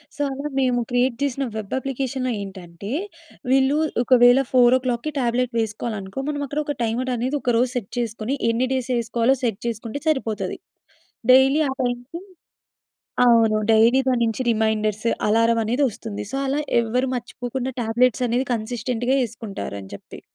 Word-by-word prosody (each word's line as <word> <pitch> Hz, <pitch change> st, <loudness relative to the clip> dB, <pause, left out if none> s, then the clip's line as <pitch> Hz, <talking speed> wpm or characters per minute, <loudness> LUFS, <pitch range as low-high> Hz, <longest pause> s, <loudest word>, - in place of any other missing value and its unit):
So, -, -, -5 dB
అలా 280 Hz, +2 st, -4 dB
మేము 250 Hz, -2 st, +2 dB
create 245 Hz, 0 st, +1 dB
జేసిన 275 Hz, -1 st, -1 dB
వెబ్ 215 Hz, -2 st, -5 dB
అప్లికేషన్‌లో 265 Hz, -1 st, -2 dB
ఏంటంటే, 190 Hz, 0 st, -8 dB, 0.6 s
వీళ్ళు 270 Hz, +2 st, +3 dB, 0.3 s
ఒకవేళ 245 Hz, +1 st, +6 dB
4:00కి 250 Hz, +2 st, +3 dB
టాబ్లెట్ 245 Hz, 0 st, 0 dB
వేసుకోవాలి 220 Hz, 0 st, -3 dB
అనుకో, 190 Hz, +7 st, -6 dB
మనం 290 Hz, -1 st, -3 dB
అక్కడ 290 Hz, +3 st, -3 dB
ఒక 290 Hz, -, -3 dB
టైమర్ 240 Hz, +3 st, -1 dB
అనేది 255 Hz, +5 st, -1 dB
ఒక 245 Hz, -, +1 dB
రోజు 245 Hz, +1 st, +2 dB
సెట్ 230 Hz, -6 st, -4 dB
చేసుకొని, 230 Hz, +2 st, -2 dB
ఎన్ని 235 Hz, +3 st, +1 dB
డేస్ 260 Hz, -1 st, -2 dB
యేసుకోవాలో 235 Hz, +2 st, +1 dB
సెట్ 225 Hz, -5 st, -1 dB
చేసుకుంటే 230 Hz, +4 st, -4 dB
సరిపోతది. 265 Hz, -8 st, -1 dB, 0.8 s
డైలీ 270 Hz, +4 st, +5 dB
ఆ -, -, -2 dB
టైంకి 245 Hz, +7 st, -4 dB, 1.1 s
అవును. 225 Hz, -2 st, +5 dB, 0.2 s
డైలీ 230 Hz, +4 st, +5 dB
దాని 245 Hz, -2 st, +1 dB
నుంచి 225 Hz, +3 st, -2 dB
రిమైండర్స్ 215 Hz, 0 st, 0 dB, 0.2 s
అలారం 230 Hz, +2 st, +3 dB
అనేది 245 Hz, +6 st, +1 dB
వస్తుంది. 215 Hz, -1 st, -7 dB
సో, -, -, -2 dB
అలా 280 Hz, +2 st, 0 dB, 0.2 s
ఎవ్వరు 250 Hz, +3 st, 0 dB
మర్చిపోకుండా 245 Hz, +2 st, -4 dB
టాబ్లెట్స్ 240 Hz, +2 st, +2 dB
అనేది 245 Hz, +3 st, 0 dB
కన్సిస్టెంట్‌గా 245 Hz, +3 st, -1 dB
యేసుకుంటారు 220 Hz, -, -6 dB
అని 95 Hz, -, -12 dB
చెప్పి. -, -, -13 dB
245 Hz, 145 wpm, -22 LUFS, 225-260 Hz, 1.1 s, ఒకవేళ